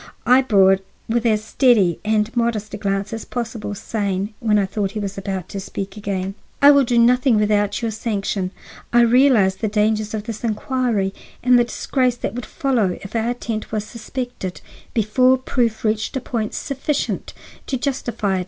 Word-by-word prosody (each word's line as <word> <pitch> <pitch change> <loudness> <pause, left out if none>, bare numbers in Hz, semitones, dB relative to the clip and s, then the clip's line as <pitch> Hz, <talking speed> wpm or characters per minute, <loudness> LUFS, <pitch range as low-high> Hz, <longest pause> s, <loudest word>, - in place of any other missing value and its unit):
I 250 +2 +6
bore 195 -7 +5
it 195 0 -3 0.2
with 235 +1 +1
as 215 -1 +2
steady 220 - +3
and 215 +2 0
modest 230 -3 -1
a - - -3
glance 200 0 -2
as 225 - -4
possible, 230 -4 -4
saying, 200 -1 -2
when 215 -2 +2
I 200 - +2
thought 195 0 -2
he 215 - -3
was 200 -1 -4
about 190 -2 -4
to 200 - -5
speak 195 +1 -6
again: 195 -2 -3 0.3
"I 285 +1 +8
will 280 -1 +5
do 240 -1 +1
nothing 250 +1 +4
without 205 +1 +1
your 225 - 0
sanction. 200 -3 -2 0.4
I 240 0 +5
realize 235 -5 +4
the 215 - -1
dangers 215 0 0
of 210 - -4
this 220 0 -7
inquiry 225 -3 0 0.3
and 250 0 +6
the 240 - +3
disgrace 250 +1 0
that - - -3
would 240 -2 -6
follow 230 -10 0
if 195 - -9
our 225 +1 +1
attempt 230 -3 -4
was 215 -1 -1
suspected 235 -3 -6 0.3
before 255 +4 +4
proof 240 -4 -1
reached 215 +4 0
a - - 0
point 230 -4 -3
sufficient 280 +1 -2 0.3
to 265 - -1
justify 240 -7 -1
it. - - -1
220 Hz, 180 wpm, -21 LUFS, 200-245 Hz, 0.4 s, I